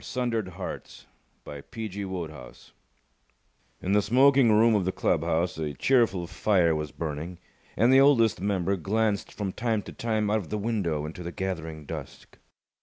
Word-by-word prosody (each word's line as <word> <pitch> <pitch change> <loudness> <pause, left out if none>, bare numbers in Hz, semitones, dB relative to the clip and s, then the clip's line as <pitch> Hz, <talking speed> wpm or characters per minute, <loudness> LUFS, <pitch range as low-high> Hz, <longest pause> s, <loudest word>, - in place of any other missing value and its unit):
_ - - -17
4 - - -10
Sundered 120 -5 -1
Hearts - - -7 0.4
In 70 -1 -8 2.3
the 105 - +4
smoking 130 +3 +5
room 110 +2 +5
of 105 -3 +2
the 95 - 0
club 85 -3 0
house 85 0 -1
a 75 -2 -3
cheerful 115 - +2
fire 85 0 +2
was 75 -2 -3
burning, 80 +2 -5 0.4
and 120 +6 +4
the 135 - +7
Oldest 115 -9 +4
Member 100 -1 0
glanced 105 +3 -1
from 100 -3 -4
time 110 0 -1
to - - -9
time 110 -2 -1
out 110 - +3
of 95 -7 -6
the 105 - -2
window 100 -9 -1
into 80 +3 -7
the 85 0 -5
gathering 80 -5 -5
dusk. - - -9
100 Hz, 160 wpm, -27 LUFS, 85-110 Hz, 2.3 s, the